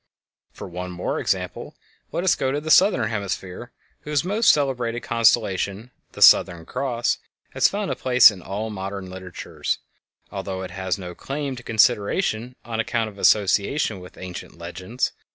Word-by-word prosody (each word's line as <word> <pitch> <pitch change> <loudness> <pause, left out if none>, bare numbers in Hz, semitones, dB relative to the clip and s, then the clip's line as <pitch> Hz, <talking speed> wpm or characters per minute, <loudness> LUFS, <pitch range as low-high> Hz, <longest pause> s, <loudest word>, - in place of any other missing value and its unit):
For - - -9
one 90 +1 -6
more 90 0 -3
example, - - -3 0.4
let 175 - -2
us 190 - +4
go 130 - -1
to 145 - -1
the 155 +1 -3
southern 180 - +5
hemisphere, 100 +2 -4 0.3
whose 150 -2 -1
most 205 +6 +2
celebrated 125 -5 +1
constellation, 110 -1 +1 0.2
the - - +2
"Southern 85 -2 +6
Cross," 125 0 -1 0.3
has - - +4
found 205 0 -3
a - - -1
place 125 -3 +6
in 95 -3 -10
all 105 +5 -4
modern 95 -1 -6
literatures, 95 -1 -4 0.5
although 95 -1 -4
it 90 - -7
has 95 +1 -2
no 90 -2 -7
claim 140 +5 -4
to 120 - -9
consideration 115 - +1
on 115 -1 -4
account 115 0 -1
of 100 - -16
association 105 +3 +2
with 90 0 -13
ancient 90 -2 -8
legends. 90 +8 -3
110 Hz, 155 wpm, -23 LUFS, 95-125 Hz, 0.5 s, Southern